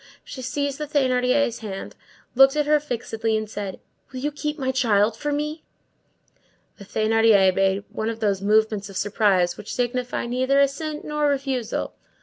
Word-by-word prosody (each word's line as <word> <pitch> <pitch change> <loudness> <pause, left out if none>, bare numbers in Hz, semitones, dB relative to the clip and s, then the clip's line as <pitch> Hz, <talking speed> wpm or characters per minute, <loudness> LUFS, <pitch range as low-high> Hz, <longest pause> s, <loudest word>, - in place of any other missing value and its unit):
She 260 - -8
seized 280 +2 -2
the 300 - -3
Thénardier's 255 -3 +1
hand, 200 -3 -7 0.4
looked 270 +2 +6
at 300 -1 +1
her 300 0 +4
fixedly, 225 -5 -2
and 215 0 -3
said:— 200 -2 -6 0.3
"Will 260 - -6
you 295 +3 -2
keep 300 +1 -4
my 260 -3 -1
child 220 -4 +2
for 295 +4 -3
me?" 300 +2 -3 1.2
The 200 - -10
Thénardier 215 -2 +3
made 195 +1 +1
one 220 +1 -3
of 225 0 -5
those 200 -3 0
movements 215 0 +1
of 195 - -7
surprise 195 -4 +1
which 210 - -7
signify 250 0 -2
neither 260 +3 +1
assent 300 +2 -1
nor 300 0 0
refusal. 270 -5 -2
245 Hz, 160 wpm, -23 LUFS, 215-280 Hz, 1.2 s, looked